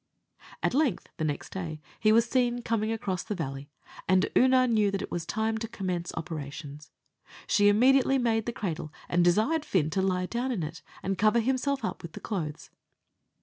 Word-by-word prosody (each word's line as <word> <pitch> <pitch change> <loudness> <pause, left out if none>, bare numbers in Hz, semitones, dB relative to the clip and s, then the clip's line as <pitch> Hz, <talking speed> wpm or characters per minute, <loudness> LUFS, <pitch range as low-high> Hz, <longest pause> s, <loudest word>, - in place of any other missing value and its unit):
At - - +1
length, 270 - +1
the 160 - -2
next 150 -2 -3
day, 165 -5 -4 0.2
he 215 - +4
was 230 +1 +5
seen 245 -1 +1
coming 225 -1 0
across 195 -5 -2
the 215 -2 -4
valley, 140 -4 -5 0.4
and 185 0 +4
Oonagh 255 -1 +5
knew 215 -2 +3
that 195 -1 -2
it - - -7
was 170 -2 -3
time 220 +1 -1
to 225 - -3
commence 185 -6 -3
operations. 150 -3 -6 0.6
She 205 0 +4
immediately 265 +5 +4
made 225 -3 +1
the - - 0
cradle, 165 -9 -4 0.2
and 175 0 +2
desired 220 - +3
Fin 160 - +1
to 190 - +1
lie 185 -1 +1
down 240 +6 -2
in 200 -9 -2
it, 160 +3 -6 0.2
and 195 0 -2
cover 215 +3 +4
himself 265 +3 0
up - - -4
with 170 -2 -9
the - - -7
clothes. 160 -8 -5
205 Hz, 190 wpm, -28 LUFS, 170-235 Hz, 0.6 s, was